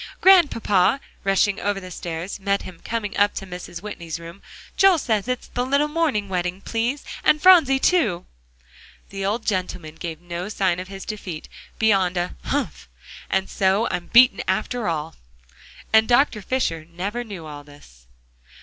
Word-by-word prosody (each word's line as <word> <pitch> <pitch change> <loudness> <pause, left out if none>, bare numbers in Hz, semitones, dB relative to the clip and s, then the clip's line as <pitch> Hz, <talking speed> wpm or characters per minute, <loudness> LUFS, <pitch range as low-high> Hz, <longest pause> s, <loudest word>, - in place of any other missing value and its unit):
"Grandpapa," 355 - +5
Polly 200 +7 +4 0.2
rushing 195 +1 +2
over 205 -1 -1
the 185 -1 -10
stairs, 170 +3 -5
met 200 0 0
him 180 -3 -11
coming 225 -3 -3
up 205 0 +3
to 195 - -5
Mrs. 180 -1 -8
Whitney's 170 -6 -6
room, 170 +3 -11 0.3
"Joel 390 -3 +5
says 220 -7 -1
it's 250 -1 -2
the 245 - -2
little 280 +3 +2
morning 300 -10 0
wedding 180 0 -2
please; 235 +7 -2 0.2
and 305 - +4
Phronsie 320 -6 +6
too!" 235 - +1 0.9
The 195 0 -5
old 215 +4 -1
gentleman 180 -5 -2
gave 160 -1 -6
no 175 +2 -6
sign 190 -5 0
of 185 - -6
his 195 0 -9
defeat, 185 -7 -6 0.3
beyond 195 -5 +2
a 175 +1 -2
"Humph! 60 - -3 0.4
and 190 0 0
so 195 +4 +1
I'm 175 - -3
beaten, 240 -4 +6
after 235 +1 -1
all!" 160 -1 -2 0.8
And 220 0 +6
Dr. 240 -3 +3
Fisher 165 -9 -2
never 200 +8 -4
knew 200 -8 -8
all 145 -1 -9
this. 60 - -18
195 Hz, 160 wpm, -23 LUFS, 175-235 Hz, 0.9 s, Phronsie